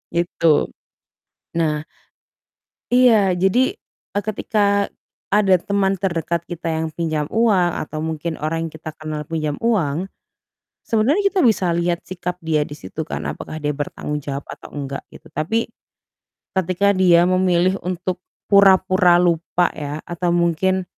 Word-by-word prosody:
gitu. 170 -2 +2 0.9
Nah 155 -2 0 1.1
Iya, 230 -6 +5
jadi, 235 - +3 0.4
eee, 205 - -1
ketika 200 -1 +1 0.4
ada 200 -2 +5
teman 195 -1 +1
terdekat 170 -2 -2
kita 170 -1 -6
yang 160 0 -1
pinjam 155 -2 -1
uang 205 -6 +3 0.2
atau 155 0 -5
mungkin 160 +1 -3
orang 165 +2 -2
yang - - -10
kita 160 0 -7
kenal 155 -1 -4
pinjam 155 -1 -2
uang, 185 -6 0 0.7
sebenarnya 285 - +2
kita 380 -3 +1
bisa 210 -6 +3
lihat 170 0 0
sikap 180 -1 -5
dia 155 -2 +1
di 145 - -11
situ 155 +1 -6
kan - - -4
apakah 155 - -6
dia 150 -1 -2
bertanggung 150 0 -4
jawab 140 0 -5
atau - - -10
enggak, 140 -1 -5
gitu. - - -14
Tapi, 220 +10 -1 0.8
ketika 190 +2 +2
dia 180 -3 +5
memilih 185 0 +2
untuk 180 0 -3 0.2
pura-pura 185 -3 +5
lupa 175 0 +1
ya, 150 +1 -6
atau 175 +1 -3
mungkin 175 +2 +1
175 Hz, 135 wpm, -21 LUFS, 160-195 Hz, 1.1 s, Iya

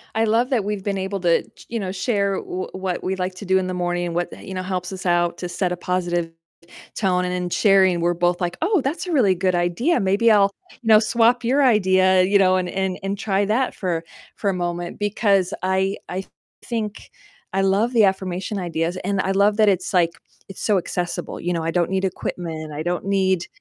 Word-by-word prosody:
I 225 - +2
love 230 +4 +2
that 230 -6 +2
we've 205 -1 -3
been 200 -1 -1
able 195 +1 -3
to 170 -2 +3
ch - - -18
you 230 -1 -2
know, 185 -2 -3
share 200 0 0
w 185 +1 -5
what 185 -1 -3
we 190 +1 -1
like 185 0 -3
to 200 - -9
do 190 +1 +3
in 185 -1 0
the 185 - -3
morning, 175 0 -1
and 170 - -5
what, 175 0 0 0.2
you 190 - -7
know, 185 - -3
helps 185 0 -3
us 190 0 -7
out 175 -1 +1
to 180 - -4
set 180 +1 -1
a 180 - -2
positive 175 -2 -1 0.6
tone, 180 -3 +1
and 180 - -2
in 180 -1 -2
sharing, 190 -3 +4
we're 175 +1 +1
both 175 +1 +1
like, 175 -1 -2
"Oh, 375 +2 +2
that's 305 +7 -2
a - - -3
really 240 - +4
good 185 0 0
idea, 175 - +1
maybe 200 +4 +3
I'll, 200 -2 +5 0.3
you 225 - -10
know, 215 -1 +8
swap 235 +2 +2
your 270 +4 +2
idea, 185 -5 +4
you 200 +2 +3
know, 185 -1 +4
and 180 -1 -2
and 190 -1 -2
and 195 +1 -3
try 200 -1 0
that 240 +5 0
for 175 -4 -2 0.3
for 200 - -1
a - - -3
moment," 175 0 -4
because 205 -3 +1
I 190 +1 +1
I 190 +2 -4 0.4
think 220 -3 -4 0.4
I 195 - +1
love 200 +6 +2
the 225 - +5
affirmation 190 +1 -1
ideas, 170 0 -2
and 200 +1 -1
I 195 - -1
love 205 +2 +3
that 215 - +4
it's, 185 -1 0
like, 175 -3 +3 0.4
it's 190 - -9
so 210 -3 +2
accessible, 175 0 -3
you 175 - -2
know, 165 -2 -1
I 165 - -1
don't 175 -1 +1
need 190 0 0
equipment, 165 -4 -4
I 150 +1 -4
don't 175 +2 -2
need 190 -3 +1
190 Hz, 225 wpm, -22 LUFS, 180-205 Hz, 0.6 s, know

